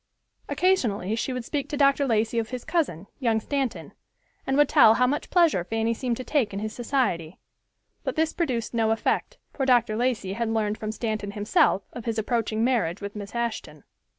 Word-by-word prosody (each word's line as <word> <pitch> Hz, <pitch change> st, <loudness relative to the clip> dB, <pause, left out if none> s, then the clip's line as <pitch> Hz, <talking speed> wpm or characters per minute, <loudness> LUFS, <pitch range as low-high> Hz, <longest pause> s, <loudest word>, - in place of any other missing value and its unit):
Occasionally 225 Hz, -, +1 dB
she 235 Hz, -, -2 dB
would 250 Hz, -2 st, -4 dB
speak 285 Hz, 0 st, -3 dB
to 290 Hz, -, -3 dB
Dr. 280 Hz, 0 st, +3 dB
Lacey 225 Hz, 0 st, +1 dB
of 225 Hz, -, -3 dB
his 250 Hz, -2 st, -6 dB
cousin, 310 Hz, -, -1 dB
young 230 Hz, -4 st, +2 dB
Stanton, 270 Hz, +2 st, -3 dB, 0.5 s
and 270 Hz, +1 st, +1 dB
would 295 Hz, -1 st, +5 dB
tell 220 Hz, -3 st, +6 dB
how 250 Hz, -, +3 dB
much 285 Hz, +4 st, -1 dB
pleasure 330 Hz, -, +3 dB
Fanny 225 Hz, +4 st, -1 dB
seemed 240 Hz, 0 st, -2 dB
to 255 Hz, -, -5 dB
take 245 Hz, -5 st, 0 dB
in 195 Hz, -, -3 dB
his 215 Hz, +1 st, -4 dB
society. 230 Hz, -, -1 dB, 0.7 s
But -, -, -3 dB
this 320 Hz, 0 st, +1 dB
produced 250 Hz, -10 st, -2 dB
no 225 Hz, -2 st, +2 dB
effect, 225 Hz, 0 st, 0 dB, 0.2 s
for 275 Hz, -, -2 dB
Dr. 240 Hz, -4 st, +3 dB
Lacey 230 Hz, -5 st, -1 dB
had 230 Hz, +2 st, -2 dB
learned 215 Hz, -1 st, -1 dB
from 215 Hz, -1 st, -3 dB
Stanton 215 Hz, -2 st, -3 dB
himself 210 Hz, -, +2 dB
of 240 Hz, -, -8 dB
his 230 Hz, -2 st, -2 dB
approaching 220 Hz, 0 st, 0 dB
marriage 230 Hz, -8 st, +1 dB
with 200 Hz, 0 st, -7 dB
Miss 205 Hz, +1 st, -7 dB
Ashton. 220 Hz, -11 st, -4 dB
230 Hz, 190 wpm, -25 LUFS, 215-260 Hz, 0.7 s, tell